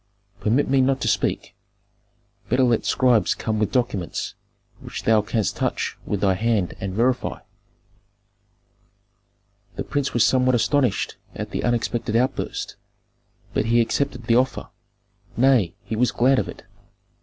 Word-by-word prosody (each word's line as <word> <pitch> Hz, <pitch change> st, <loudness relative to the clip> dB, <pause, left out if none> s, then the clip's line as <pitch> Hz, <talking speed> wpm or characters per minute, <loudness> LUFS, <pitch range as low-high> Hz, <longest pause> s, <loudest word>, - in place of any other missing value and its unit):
Permit 120 Hz, +7 st, +1 dB
me 135 Hz, 0 st, +3 dB
not 135 Hz, +1 st, +2 dB
to -, -, -1 dB
speak. -, -, -1 dB, 1.0 s
Better 125 Hz, +3 st, +3 dB
let 120 Hz, -3 st, +2 dB
scribes 120 Hz, -7 st, +3 dB
come 110 Hz, -1 st, -2 dB
with 105 Hz, -, 0 dB
documents, 110 Hz, -, -2 dB, 0.5 s
which -, -, -7 dB
thou 110 Hz, -1 st, +4 dB
canst 105 Hz, 0 st, -1 dB
touch -, -, -1 dB
with 100 Hz, -2 st, -2 dB
thy 95 Hz, -2 st, +3 dB
hand 105 Hz, -2 st, 0 dB
and 95 Hz, -1 st, -4 dB
verify." 125 Hz, +3 st, 0 dB, 2.4 s
The -, -, -3 dB
prince 145 Hz, -2 st, -2 dB
was 120 Hz, -, +3 dB
somewhat 130 Hz, 0 st, +3 dB
astonished 130 Hz, -1 st, +1 dB, 0.2 s
at -, -, -5 dB
the -, -, -3 dB
unexpected 120 Hz, -2 st, -1 dB
outburst, 125 Hz, +3 st, -1 dB, 0.8 s
but -, -, 0 dB
he 115 Hz, +1 st, +3 dB
accepted 125 Hz, +2 st, 0 dB
the 115 Hz, +1 st, +3 dB
offer; 130 Hz, +1 st, 0 dB, 0.7 s
nay, 120 Hz, -9 st, +3 dB
he 110 Hz, -, -4 dB
was 125 Hz, +2 st, +2 dB
glad 130 Hz, +2 st, +3 dB
of -, -, -3 dB
it. -, -, -10 dB
120 Hz, 140 wpm, -23 LUFS, 110-130 Hz, 2.4 s, thou